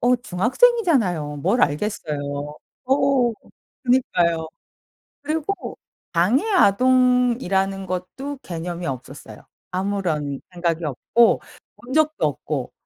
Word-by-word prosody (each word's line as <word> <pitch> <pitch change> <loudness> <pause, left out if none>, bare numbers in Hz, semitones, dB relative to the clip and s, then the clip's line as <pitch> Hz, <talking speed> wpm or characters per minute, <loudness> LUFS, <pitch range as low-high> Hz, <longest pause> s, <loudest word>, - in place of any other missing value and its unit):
어 250 +1 +4
중학생이잖아요. 235 - +2
뭘 235 - +1
알겠어요. 150 -1 -1 0.6
어 265 -2 +2 0.5
그니까요. 175 -11 +1 0.8
그리고 315 +6 -3 0.4
장애 190 - +3
아동이라는 245 - +3
것도 185 +11 -5
개념이 175 0 -5
없었어요. 135 +1 -7 0.3
아무런 180 -7 -2
생각이 170 -2 -1
없고 220 - +2 0.4
본 245 +2 -11
적도 310 - +2
없고. 145 -2 -3
195 Hz, 235 characters per minute, -22 LUFS, 170-255 Hz, 0.8 s, 어